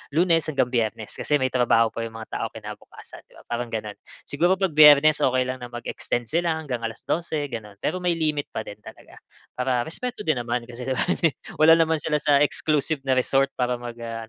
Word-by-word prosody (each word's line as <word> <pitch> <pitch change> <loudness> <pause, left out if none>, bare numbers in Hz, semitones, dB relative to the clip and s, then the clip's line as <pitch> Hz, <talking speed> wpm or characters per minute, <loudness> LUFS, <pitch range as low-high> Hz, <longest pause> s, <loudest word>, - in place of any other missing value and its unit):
Lunes 165 -1 +3
hanggang 140 -5 0
Biyernes. 110 -3 -2
Kasi 150 - 0
may 130 - +1
trabaho 115 -2 +3
pa 115 0 -4
yung 115 - -8
mga 110 0 -6
taong - - -4
kinabukasan, - - -11
'di - - -25
ba, - - -16
parang 120 0 -2
gano'n. 105 -2 -4 0.3
Siguro 175 +6 +2
'pag 190 -3 -1
Biyernes 150 0 +8
okey 130 0 +2
lang 130 - -3
na 120 - -7
mag-extend 120 0 -4
sila 170 0 +1
hanggang 135 -7 -4
alas 115 0 -6
dose, 155 -4 -2
gano'n. 105 -3 -7
Pero - - -1
may 180 -1 +1
limit 155 -3 -1
pa - - -2
din 105 - -9
talaga, - - -14 0.4
para 125 -1 0
respeto 245 +8 -4
din 155 -5 +1
naman 120 0 -2
kasi 120 +1 -7
di 130 - 0
ba, - - 0 0.6
wala 160 +1 +7
naman 160 -1 +2
sila 150 -1 0
sa 145 -1 +4
exclusive 150 0 +1
na 130 -1 +1
resort 135 +2 +2
para 125 -1 0
mag 120 -1 -7
ah 115 -1 -6
130 Hz, 210 wpm, -24 LUFS, 120-155 Hz, 0.6 s, Biyernes